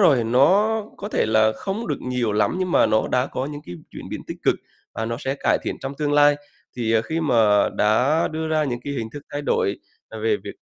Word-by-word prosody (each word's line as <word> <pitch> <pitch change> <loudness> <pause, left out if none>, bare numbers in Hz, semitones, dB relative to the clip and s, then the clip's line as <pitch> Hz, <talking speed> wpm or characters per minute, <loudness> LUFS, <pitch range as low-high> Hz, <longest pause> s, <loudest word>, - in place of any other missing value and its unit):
rồi, 140 - +5
nó 195 - +3
có 205 - -6
thể 210 - +1
là 110 0 +3
không 210 +4 -4
được - - -3
nhiều 125 -4 -1
lắm, 105 +11 +1
nhưng 185 -1 -1
mà - - +4
nó 110 0 +1
đã 125 +1 +1
có 130 - -4
những 145 0 -6
cái 90 - -7 0.2
chuyển - - -9
biến - - -4
tích - - -6
cực, - - +3 0.4
và 110 - -2
nó 115 +1 -3
sẽ 135 0 -2
cải 140 - +1
thiện - - -3
trong 135 +1 -4
tương 145 -1 0
lai. 145 0 +5 0.4
Thì, 115 -2 0
à, 110 - +4
khi 160 +6 -2
mà 110 -8 +3
đã 125 +10 +3
đưa 160 0 -3
ra 155 -1 +1
những 120 -3 -3
cái 140 - -3
hình 115 -4 -4
thức 145 - -8
thay 145 0 -3
đổi 430 - 0 0.3
là - - -7
về 440 -1 +1
việc - - -7
140 Hz, 250 wpm, -22 LUFS, 115-160 Hz, 0.4 s, rồi